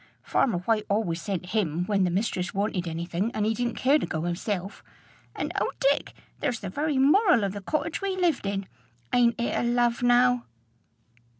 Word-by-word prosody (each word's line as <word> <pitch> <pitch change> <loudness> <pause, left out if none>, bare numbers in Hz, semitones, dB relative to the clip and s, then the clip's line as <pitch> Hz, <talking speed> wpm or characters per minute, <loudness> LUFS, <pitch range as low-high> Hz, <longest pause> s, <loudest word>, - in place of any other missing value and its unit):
Farmer 230 -9 +1
White 215 +4 0
always 195 -5 0
sent 190 -2 -3
him 180 -5 0
when 195 -1 +2
the - - +1
mistress 185 -1 -2
wanted 195 -3 -1
any 165 +1 -3
thing 175 +5 -1
and 210 - 0
he 220 - +2
didn't 240 0 -2
care 280 +4 +3
to - - -2
go 160 0 -3
hisself. 180 +3 -3 0.5
And, - - -3
O - - 0
Dick! - - +1 0.3
there's 245 -5 -2
the 195 -3 -5
very 295 +4 -1
moral 295 - +5
of 195 -1 -1
the 205 - -6
cottage 315 - -2
we 390 -1 -2
lived 335 - +1
in! 195 -1 -2 0.5
Ain't 240 -1 +3
it 235 - -1
a - - +1
love, 240 0 +1
now?" 245 0 +4
220 Hz, 190 wpm, -26 LUFS, 185-245 Hz, 0.5 s, moral